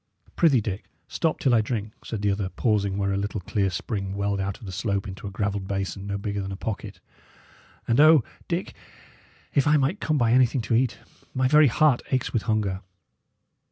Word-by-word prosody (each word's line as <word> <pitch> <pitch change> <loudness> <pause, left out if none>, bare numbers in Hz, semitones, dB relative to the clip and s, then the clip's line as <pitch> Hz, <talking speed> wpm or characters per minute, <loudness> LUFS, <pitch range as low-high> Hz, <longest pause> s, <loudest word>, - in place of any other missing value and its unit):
"Prithee, 145 -8 +4
Dick, 100 -1 -4 0.2
stop 160 -2 0
till 130 - +2
I 115 - +5
drink," 110 -1 -3
said 110 -3 -5
the 100 - +3
other, 100 -1 -2
pausing 100 -3 0
where 100 -1 0
a - - 0
little 105 +1 -2
clear 95 +1 0
spring 95 +1 -4
welled 100 0 -1
out 95 0 -2
of - - -12
the 95 - -6
slope 100 +1 -2
into 95 +1 -7
a - - -3
gravelled 100 -1 -2
basin 95 0 -3
no 100 0 -2
bigger 100 0 -3
than 95 0 -5
a - - -4
pocket. 100 -3 -5 0.9
"And 115 +3 +2
O, 155 -3 +7 0.2
Dick, - - -2 0.8
if 140 - +3
I 150 +1 +5
might 145 +9 0
come 155 -1 0
by 120 -3 +2
anything 125 0 +4
to 115 - -2
eat! 125 +1 +1 0.4
my 130 0 +2
very 150 +2 +6
heart 135 +1 +3
aches 130 -2 -1
with 115 - +1
hunger." 100 -3 0
105 Hz, 200 wpm, -25 LUFS, 100-125 Hz, 0.9 s, O